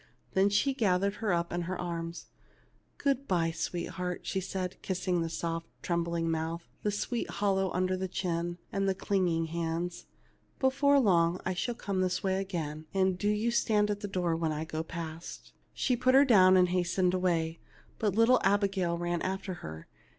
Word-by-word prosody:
Then 195 Hz, +1 st, +4 dB
she 260 Hz, +7 st, +2 dB
gathered 200 Hz, -4 st, +1 dB
her 220 Hz, -3 st, -1 dB
up 170 Hz, 0 st, 0 dB
in 175 Hz, -, -1 dB
her 180 Hz, +2 st, -4 dB
arms. 170 Hz, -1 st, -4 dB, 0.4 s
" -, -, -34 dB, 0.3 s
Good 275 Hz, -1 st, 0 dB
bye, 170 Hz, -3 st, +1 dB
sweetheart," 175 Hz, +2 st, -3 dB
she 190 Hz, -, -2 dB
said, 185 Hz, -1 st, -4 dB
kissing 185 Hz, -2 st, -1 dB
the 165 Hz, -, -2 dB
soft 165 Hz, 0 st, -3 dB, 0.2 s
trembling 170 Hz, -1 st, 0 dB
mouth, 165 Hz, +1 st, -2 dB
the 210 Hz, -, 0 dB
sweet 215 Hz, +3 st, -2 dB
hollow 195 Hz, -2 st, +1 dB
under 185 Hz, +1 st, 0 dB
the 190 Hz, 0 st, -2 dB
chin, 175 Hz, -1 st, -2 dB
and 195 Hz, 0 st, 0 dB
the 190 Hz, -, +1 dB
clinging 180 Hz, -4 st, +1 dB
hands. 170 Hz, +1 st, -3 dB, 0.5 s
"Before 280 Hz, +2 st, +4 dB
long 175 Hz, -6 st, +3 dB
I 185 Hz, -, 0 dB
shall 235 Hz, +7 st, -2 dB
come 200 Hz, -5 st, -2 dB
this 185 Hz, -1 st, 0 dB
way 190 Hz, 0 st, +1 dB
again, 160 Hz, -5 st, -4 dB
and 190 Hz, -1 st, +3 dB
do 205 Hz, +3 st, 0 dB
you 210 Hz, +3 st, +1 dB
stand 210 Hz, -3 st, +2 dB
in 205 Hz, -, -2 dB
the 205 Hz, -, -4 dB
door 180 Hz, -4 st, 0 dB
when 165 Hz, -1 st, 0 dB
I 155 Hz, +1 st, -3 dB
go 155 Hz, 0 st, -3 dB
past." 165 Hz, 0 st, -7 dB, 0.2 s
She 255 Hz, -, +1 dB
put 255 Hz, +2 st, +3 dB
her 275 Hz, +1 st, +8 dB
down 190 Hz, -7 st, +6 dB
and 180 Hz, -1 st, +4 dB
hastened 180 Hz, 0 st, +1 dB
away, 170 Hz, -3 st, 0 dB, 0.4 s
but 205 Hz, -3 st, +1 dB
little 230 Hz, +3 st, +5 dB
Abigail 195 Hz, -3 st, +2 dB
ran 175 Hz, 0 st, -1 dB
after 190 Hz, 0 st, -3 dB
her. 80 Hz, 0 st, -8 dB
185 Hz, 180 wpm, -30 LUFS, 170-200 Hz, 0.5 s, her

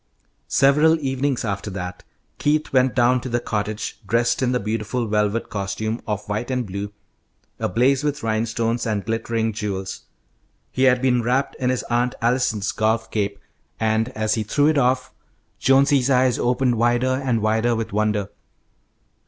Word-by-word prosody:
Several 150 Hz, +4 st, +4 dB
evenings 135 Hz, -2 st, -1 dB
after 100 Hz, 0 st, -3 dB
that, 90 Hz, -2 st, -6 dB, 0.4 s
Keith 150 Hz, 0 st, 0 dB
went 130 Hz, -1 st, +3 dB
down 125 Hz, 0 st, +3 dB
to 130 Hz, -, -5 dB
the 120 Hz, 0 st, 0 dB
cottage 105 Hz, -1 st, -3 dB
dressed 115 Hz, +2 st, +1 dB
in 125 Hz, -1 st, +1 dB
the 125 Hz, -, +1 dB
beautiful 110 Hz, +3 st, -2 dB
velvet 105 Hz, +1 st, 0 dB
costume 105 Hz, +3 st, -3 dB
of 105 Hz, -2 st, -3 dB
white 105 Hz, +4 st, -3 dB
and 125 Hz, -2 st, -1 dB
blue, 100 Hz, +1 st, -5 dB, 0.7 s
ablaze 130 Hz, +8 st, +2 dB
with 150 Hz, 0 st, -2 dB
rhinestones 115 Hz, +1 st, -1 dB
and 105 Hz, -3 st, -1 dB
glittering 115 Hz, 0 st, -1 dB
jewels. 95 Hz, -3 st, -4 dB, 0.7 s
He 130 Hz, -, +1 dB
had 125 Hz, 0 st, +3 dB
been 125 Hz, -2 st, +3 dB
wrapped 125 Hz, +4 st, 0 dB
in 125 Hz, -, 0 dB
his 130 Hz, -1 st, -1 dB
Aunt 120 Hz, +1 st, 0 dB
Allison's 115 Hz, -4 st, +1 dB
golf 110 Hz, +1 st, 0 dB
cape, 100 Hz, -2 st, -1 dB, 0.4 s
and, 110 Hz, 0 st, +1 dB
as 110 Hz, 0 st, +1 dB
he 110 Hz, -, 0 dB
threw 125 Hz, +7 st, +1 dB
it 155 Hz, -, +1 dB
off, 130 Hz, 0 st, +1 dB, 0.5 s
Jonesy's 135 Hz, 0 st, +4 dB
eyes 130 Hz, -1 st, +3 dB
opened 125 Hz, 0 st, +1 dB
wider 120 Hz, +3 st, +2 dB
and 125 Hz, -4 st, +1 dB
wider 110 Hz, +2 st, +2 dB
with 115 Hz, -3 st, -4 dB
wonder. 105 Hz, -1 st, 0 dB
115 Hz, 155 wpm, -22 LUFS, 110-130 Hz, 0.7 s, Several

